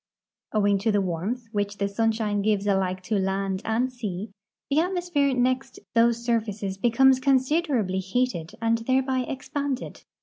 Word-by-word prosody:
Owing 205 Hz, -2 st, +2 dB
to 220 Hz, +3 st, +1 dB
the 205 Hz, -, +2 dB
warmth 195 Hz, +7 st, -2 dB
which 205 Hz, -1 st, -2 dB
the 200 Hz, -, 0 dB
sunshine 220 Hz, 0 st, 0 dB
gives 205 Hz, -1 st, +1 dB
alike 190 Hz, -2 st, 0 dB
to 210 Hz, +1 st, 0 dB
land 190 Hz, 0 st, -1 dB
and 245 Hz, +3 st, 0 dB
sea, 210 Hz, -4 st, -5 dB, 0.4 s
the 280 Hz, -, +2 dB
atmosi)here 340 Hz, -6 st, +1 dB
next 255 Hz, +2 st, 0 dB, 0.2 s
those 235 Hz, 0 st, +3 dB
surfaces 210 Hz, -4 st, -1 dB
becomes 255 Hz, +4 st, +4 dB
consider 275 Hz, +3 st, +2 dB
ably 190 Hz, -2 st, -1 dB
heated 190 Hz, -3 st, -1 dB
and 230 Hz, 0 st, +2 dB
thereby 260 Hz, +2 st, +1 dB
expanded. 270 Hz, +1 st, -4 dB
225 Hz, 145 wpm, -25 LUFS, 200-255 Hz, 0.4 s, becomes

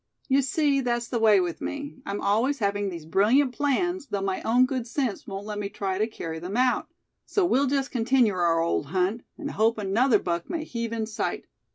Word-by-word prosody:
You 275 Hz, 0 st, +4 dB
see, 275 Hz, +1 st, +1 dB
that's 240 Hz, -1 st, -1 dB
the 235 Hz, -, -1 dB
way 215 Hz, -3 st, +6 dB
with 175 Hz, -2 st, -2 dB
me; 285 Hz, 0 st, -5 dB
I'm 200 Hz, +1 st, -3 dB
always 230 Hz, +8 st, +2 dB
having 205 Hz, -3 st, 0 dB
these 170 Hz, -4 st, -7 dB
brilliant 225 Hz, -, +3 dB
plans, 295 Hz, +4 st, 0 dB
though 200 Hz, -5 st, -2 dB
my 190 Hz, -1 st, -1 dB
own 245 Hz, +3 st, +4 dB
good 255 Hz, -2 st, -3 dB
sense 245 Hz, -3 st, -2 dB
won't 195 Hz, +1 st, -6 dB
let 210 Hz, -1 st, -4 dB
me 200 Hz, -1 st, -3 dB
try 195 Hz, -1 st, -3 dB
to 215 Hz, -, +2 dB
carry 165 Hz, -7 st, -6 dB
them 180 Hz, +6 st, -4 dB
out. 255 Hz, 0 st, +2 dB, 0.4 s
So 400 Hz, -4 st, +2 dB
we'll 280 Hz, -4 st, +2 dB
just 275 Hz, 0 st, 0 dB
continue 240 Hz, -2 st, +3 dB
our 170 Hz, -2 st, +2 dB
old 165 Hz, -3 st, 0 dB
hunt; 185 Hz, +7 st, 0 dB, 0.2 s
and 290 Hz, -3 st, -5 dB
hope 225 Hz, +2 st, +2 dB
another 215 Hz, +4 st, +3 dB
buck 170 Hz, -3 st, -3 dB
may 330 Hz, -2 st, -2 dB
heave 230 Hz, -5 st, -4 dB
in 225 Hz, -1 st, -2 dB
sight. 215 Hz, +1 st, -3 dB
225 Hz, 210 wpm, -26 LUFS, 195-265 Hz, 0.4 s, way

